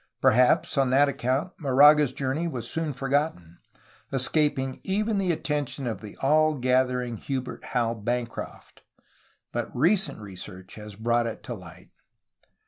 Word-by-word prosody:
Perhaps 125 +4 +3
on 135 -2 +3
that 140 +3 +5
account 135 +6 -1
Moraga's 145 0 +6
journey 135 +5 -2
was 120 -8 -5
soon 160 +1 -2
forgotten, 135 - -2 0.5
escaping 135 0 0
even 210 +2 0
the 185 -2 +1
attention 145 -4 -2
of 115 -2 -3
the 105 -2 -10
all 155 +2 +4
gathering 125 -2 +1
Hubert 130 +2 -5
Howe 115 -2 0
Bancroft, 115 +2 -5 0.7
but - - -3
recent 180 +9 +2
research 95 -2 -10
has 105 -1 -9
brought 115 +2 +1
it 115 - -6
to 120 - -5
light. 90 -3 -12
130 Hz, 135 wpm, -26 LUFS, 115-150 Hz, 0.7 s, Moraga's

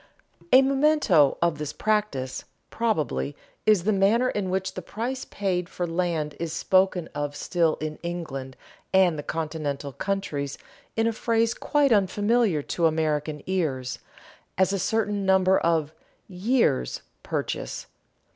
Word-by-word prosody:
A 260 +1 +8
memento 270 - +3
of 170 -3 +1
this 150 -1 -3
practice, 210 -13 -1 0.3
probably, 180 -10 -1 0.3
is 210 -5 +5
the 215 - +2
manner 215 +6 +3
in 200 -3 -2
which 190 0 -1
the 185 - -5
price 240 +8 -4
paid 180 -3 -2
for 180 - -3
land 165 -3 -1
is 165 -1 -3
spoken 185 0 +2
of 145 0 -3
still 165 +1 +1
in 155 0 -5
England 150 -7 -5 0.3
and 185 -3 +4
the 150 - -4
continental 150 -3 -3
countries 150 -8 -3 0.4
in 225 - +2
a 230 - +1
phrase 230 0 +1
quite 290 -3 +1
unfamiliar 205 -3 +2
to 170 +2 +1
American 155 -2 -1
ears, 145 -9 -2 0.6
as 190 +1 +3
a 195 - 0
certain 210 0 0
number 190 0 +4
of 160 -3 +1 0.4
"years' 190 - 0 0.2
purchase." - - -3
180 Hz, 135 wpm, -25 LUFS, 155-210 Hz, 0.6 s, A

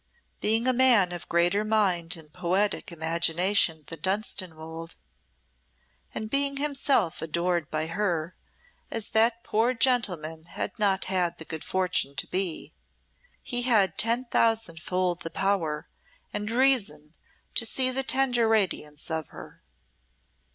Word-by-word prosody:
Being 225 +2 +2
a 255 - +4
man 240 -8 +4
of 175 -1 -7
greater 175 +5 +2
mind 185 -6 +1
and 155 -2 -14
poetic 190 +3 -1
imagination 165 +1 +1
than 165 +1 -8
Dunstanwolde, 165 -5 -3 1.2
and 220 - -4
being 275 +3 +2
himself 275 - +1
adored 170 0 -1
by 155 0 -1
her, 170 -1 -2 0.5
as 225 -2 -3
that 230 +1 +3
poor 230 +4 +1
gentleman 180 -11 0
had 170 +6 -5
not 195 -2 +1
had 180 -2 0
the 160 - -8
good 160 -1 -6
fortune 180 -7 0
to - - -2
be, 185 -3 -2 0.7
he 245 -2 -1
had 220 -6 +3
ten 235 +3 +2
thousand 225 -8 +1
fold 180 0 -1
the 165 - -4
power 165 -5 -1 0.5
and 210 +1 -3
reason 225 - +1 0.4
to - - +2
see 255 +3 +2
the 265 +1 0
tender 260 -3 +2
radiance 175 -9 -1
of 160 -2 -2
her. - - -13
190 Hz, 130 wpm, -27 LUFS, 165-230 Hz, 1.2 s, a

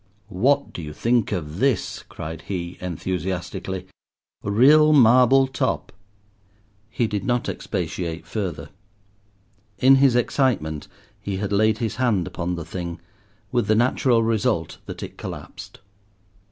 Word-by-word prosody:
"What 135 +9 +1
do - - -6
you 75 -1 -7
think 120 +4 +1
of 85 -3 -4
this?" 135 -2 0
cried 80 +1 -7
he 90 -2 -4
enthusiastically, 90 +1 -4 0.6
"real 145 +9 +5
marble 130 0 +6
top—" 130 0 -2 1.0
He 115 +1 0
did 105 -3 -2
not 120 -1 0
expatiate 85 -2 -4
further. 100 -5 -4 1.1
In 135 +5 +6
his 135 -2 +4
excitement 110 - 0 0.3
he 100 -2 -3
had 100 0 -3
laid 110 +1 +3
his 115 -2 -3
hand 115 -9 +1
upon 90 +1 -3
the 85 -2 -6
thing, 85 0 -5 0.5
with 120 -4 +1
the 110 - +3
natural 120 0 +3
result 110 -6 0
that - - -7
it - - -9
collapsed. - - -9
105 Hz, 125 wpm, -23 LUFS, 90-125 Hz, 1.1 s, marble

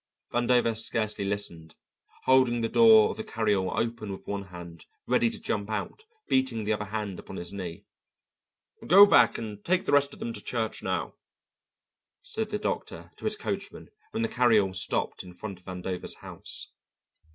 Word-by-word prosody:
Vandover 120 -1 +3
scarcely 110 -2 0
listened, 100 -5 -3 0.5
holding 130 -2 +4
the 115 - +1
door 220 - +7
of - - -8
the 220 - -4
carry 110 - 0
all 95 +1 0
open 115 -2 -2
with 95 - -8
one 100 -1 -4
hand, 85 -3 -11 0.2
ready 120 - +3
to - - -6
jump 100 0 -2
out, 110 - -4 0.2
beating 130 -4 +1
the 105 +1 +1
other 105 0 -3
hand 105 -3 -4
upon - - -9
his 85 +1 -6
knee. 90 -4 -6 1.0
"Go 195 +4 +10
back 120 - +5
and 105 -2 -7
take 185 +1 +1
the - - 0
rest 140 0 +4
of - - -11
them 115 - -4
to - - -6
church 115 -2 -3
now," 95 -2 -2 1.1
said 220 -1 -3
the 210 - -1
doctor 210 - -4
to - - -10
his - - +1
coachman - - -5 0.2
when 230 - -2
the - - +2
carry 125 - +4
all 95 -2 -1
stopped 95 0 -1
in 90 -1 -12
front 100 -2 -7
of 90 - -25
Vandover's 90 -1 -4
house. - - -7
110 Hz, 180 wpm, -28 LUFS, 95-125 Hz, 1.1 s, Go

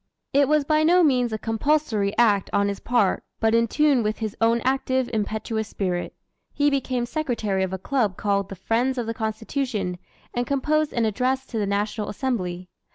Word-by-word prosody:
It 280 0 +4
was 305 0 +3
by 305 +2 +2
no 350 +3 +5
means 250 -6 +2
a 220 - -1
compulsory 225 -3 0
act 210 -5 +3
on 200 0 +2
his 200 - -4
part, 235 -5 +1 0.2
but 225 0 +2
in 230 0 +3
tune 290 0 +3
with 215 0 -1
his 215 -3 -4
own 230 +1 +4
active, 260 -1 0
impetuous 220 0 -2
spirit. 180 -3 -3 0.4
He 290 0 +2
became 255 -3 -1
secretary 235 -9 -1
of 190 -1 -1
a 190 - -2
club 215 -2 -1
called 200 -1 0
the 195 - -6
"Friends 235 +7 0
of 240 - -1
the 230 - -3
Constitution," 220 -4 -3 0.3
and 245 0 -1
composed 300 +2 +1
an 235 -2 0
Address 255 +5 0
to 230 -4 -4
the 205 - 0
National 205 +1 -1
Assembly. 185 -7 -3
230 Hz, 185 wpm, -24 LUFS, 205-265 Hz, 0.4 s, no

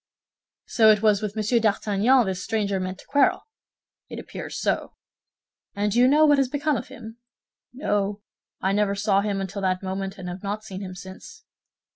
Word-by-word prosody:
"So 220 -2 +4
it 215 0 +4
was 210 -1 +4
with 210 -1 -4
Monsieur 220 +2 +1
d'Artagnan 215 +3 +2
this 190 -2 -3
stranger 200 -3 -1
meant 185 0 -4
to - - -16
quarrel?" 285 -1 +2 0.7
"It - - -7
appears - - -7
so." - - -1 0.8
"And 205 +1 0
do 235 - +1
you 250 - +6
know 300 +3 +5
what 290 -2 +4
has 270 -2 +1
become 290 +2 0
of - - -4
him?" 225 +2 -11 0.5
"No, 205 -6 -2 0.4
I 190 - +1
never 200 0 +1
saw 200 -1 +2
him 200 -1 -2
until 195 +1 -4
that 185 0 -1
moment, 195 +1 -4
and 185 -2 -7
have 180 +1 -6
not 205 +1 -4
seen 195 -3 -8
him 185 -2 -7
since." 190 - -11
205 Hz, 185 wpm, -24 LUFS, 195-225 Hz, 0.8 s, you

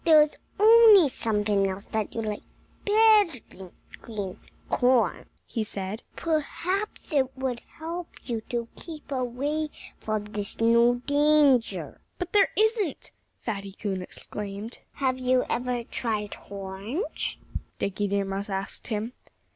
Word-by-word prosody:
"If - - -30
there 320 -2 +8
was 300 0 +1 0.2
only 435 -6 +8
something 210 -4 +1
else 190 +1 -4
that 220 -2 -3
you 225 - -1
liked 210 -1 -3 0.4
better 420 - +5
than 185 -2 -11 0.3
green 205 -5 -5 0.3
corn," 250 -1 +2 0.2
he 225 - -2
said, 200 +1 -5
"perhaps 340 +6 -2
it 265 -2 +1
would 260 -2 -2 0.2
help 335 +2 -5 0.2
you 230 -3 -3
to 235 -1 -2
keep 310 -4 -10
away 275 +4 -1 0.3
from 215 -1 -2
this 210 -1 -5
new 235 +2 +4
danger." 290 -4 +3 0.2
"But 360 -1 -5
there 410 -1 +6
isn't!" 435 - +1 0.3
Fatty 200 -3 -4
Coon 195 -2 -3
exclaimed. 205 +4 -6
"Have 260 -2 0
you 255 0 +2
ever 245 0 -1
tried 215 -3 -2
horns?" 200 - -4 0.4
Dickie 200 +1 -1
Deer 200 0 0
Mouse 195 +1 -4
asked 195 0 -4
him. 225 +1 -2
245 Hz, 130 wpm, -27 LUFS, 210-305 Hz, 0.4 s, there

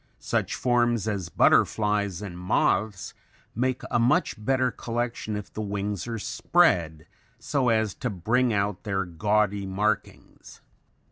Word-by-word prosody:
Such - - -2
forms 120 -3 +1
as 100 -5 -2
butterflies 105 -1 +2
and 95 -4 -7
moths 95 +2 0 0.4
make 130 +2 -1
a - - +2
much 130 +9 +2
better 130 0 +1
collection 115 -2 -3
if 105 -1 -7
the 110 - -4
wings 100 -1 -3
are 115 -1 -3
spread 85 - +1 0.3
so 135 -4 0
as 110 -3 +1
to 125 - -1
bring 115 +6 +1
out 100 -2 -1
their 95 -3 -2
gaudy 100 +3 0
markings. 105 +3 -3
105 Hz, 130 wpm, -26 LUFS, 100-120 Hz, 0.4 s, butterflies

